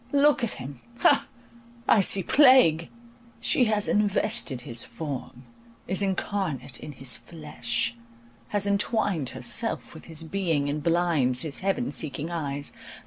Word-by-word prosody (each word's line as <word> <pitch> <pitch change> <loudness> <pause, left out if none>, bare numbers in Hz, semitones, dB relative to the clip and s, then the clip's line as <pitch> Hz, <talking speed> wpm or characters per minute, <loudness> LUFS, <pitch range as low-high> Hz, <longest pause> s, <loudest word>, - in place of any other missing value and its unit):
Look 285 -2 +4
at 235 - -1
him—ha! 140 - 0 0.6
I 210 - +6
see 195 0 +3
plague! 255 - +5 0.5
She 250 - +2
has 215 -2 +1
invested 205 - 0
his 120 -1 -4
form, 135 -4 -7 0.4
is 190 +2 +2
incarnate 190 - -2
in 150 - -8
his 130 -1 -2
flesh, 120 -8 -3 0.5
has 205 +6 +1
entwined 200 - 0
herself - - -1
with - - -12
his 160 0 -3
being, 160 -5 -1
and 150 +1 -2
blinds 165 -7 +1
his 155 -4 0
heaven 195 +6 -1
seeking 155 +1 -2
eyes. 145 -4 -3
165 Hz, 130 wpm, -26 LUFS, 140-205 Hz, 0.6 s, I